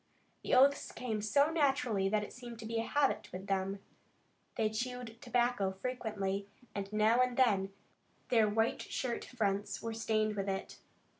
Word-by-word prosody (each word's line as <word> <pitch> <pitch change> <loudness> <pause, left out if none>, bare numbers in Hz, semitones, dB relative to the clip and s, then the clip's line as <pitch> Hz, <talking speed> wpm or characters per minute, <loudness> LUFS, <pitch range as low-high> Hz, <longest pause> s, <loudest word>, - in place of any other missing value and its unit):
The - - +1
oaths 275 +2 +5
came 225 -3 -3
so 280 +8 +3
naturally 270 -10 +2
that 210 0 +1
it - - -8
seemed 240 -2 -9
to 225 - -8
be 225 +1 -1
a - - 0
habit 285 -2 +1
with 185 +1 -6
them. 195 0 -1 0.8
They 220 - +2
chewed 240 0 -4
tobacco 240 -5 +1
freely, 200 -3 -3 0.3
and 200 0 -4
now 215 +3 +4
and 250 -1 +1
then 200 -7 +3 0.6
their 225 -3 +4
white 225 +2 +1
shirt 245 -3 -3
fronts 200 -4 -1
were 230 0 -3
stained 215 -1 0
with 200 -1 -2
it. 195 0 -4
225 Hz, 160 wpm, -33 LUFS, 200-250 Hz, 0.8 s, oaths